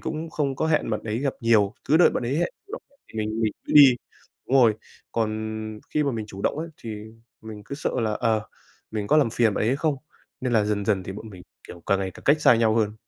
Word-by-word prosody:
cũng 160 +1 -5
không 140 -4 -1
có 160 - 0
hẹn 155 -7 +1
bạn 110 - -1
ấy 110 +1 -3
gặp 140 0 -1
nhiều, 110 -3 +3
cứ 155 - +5
đợi 175 - +6
bạn - - -2
ấy 135 +5 -1
hẹn 175 - +1 0.2
chủ 400 - -15
động - - -6 0.3
thì 110 - -8
mình 110 +1 -2
mình 110 - +1
cứ - - -5
đi. 140 -4 +9 0.5
Đúng 135 - +3
rồi. 110 -3 +5 0.4
Còn 110 -1 -1 0.6
khi 150 - +3
mà 140 - +1
mình 110 -2 -4
chủ 100 -1 -9
động - - 0
ấy 165 +1 -4
thì 115 - -8 0.5
mình 110 -2 -9
cứ 140 - -6
sợ 150 - -2
là, 110 -2 0
ờ, 110 -1 0 0.4
mình 105 -2 -3
có 150 - +3
làm 140 -7 +3
phiền 115 -3 +2
bạn - - -1
ấy - - +1
hay 130 - +2
không? 150 -1 0 0.4
Nên 130 -2 -2
là 110 -2 +3
dần 105 -1 -1
dần 100 -4 +1
thì 95 - -6
bọn 105 +2 -9
mình, 90 -2 -12 0.3
kiểu, 85 -1 -11
càng 100 - +2
ngày 95 -1 -2
càng - - -15
cách 150 +2 +4
xa - - +6
nhau 110 -1 +2
hơn. 105 -2 +1
115 Hz, 265 wpm, -24 LUFS, 105-140 Hz, 0.6 s, đi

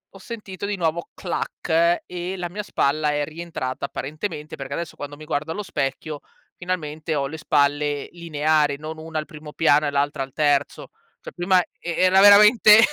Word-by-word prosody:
ho - - -9
sentito 200 -3 -7
di 205 -1 -2
nuovo 170 0 -1
"clac" 170 -1 0
e 180 +1 -5
la 175 -1 -4
mia 210 +4 -5
spalla 150 -4 +1
è 145 0 0
rientrata 160 -6 -6
apparentemente, 150 +1 -5
perché 135 0 -8
adesso 170 +1 -5
quando 145 0 -8
mi 155 - -11
guardo 150 +2 -2
allo 210 - -3
specchio 145 -3 -3 0.3
finalmente 160 -3 -3
ho 140 -1 0
le 160 +3 -7
spalle 145 -1 +1
lineari, 155 -3 +1
non 155 +1 -7
una 160 0 -6
al 155 - -5
primo 150 0 -11
piano 150 -2 +3
e - - -1
l'altra 140 0 0
al 135 - -9
terzo. 145 -2 0 0.3
Cioè - - -10
prima 180 +1 +3
e - - -9
e 175 - -4
era 190 +1 +6
veramente 210 +1 +8
155 Hz, 180 wpm, -23 LUFS, 145-180 Hz, 0.3 s, veramente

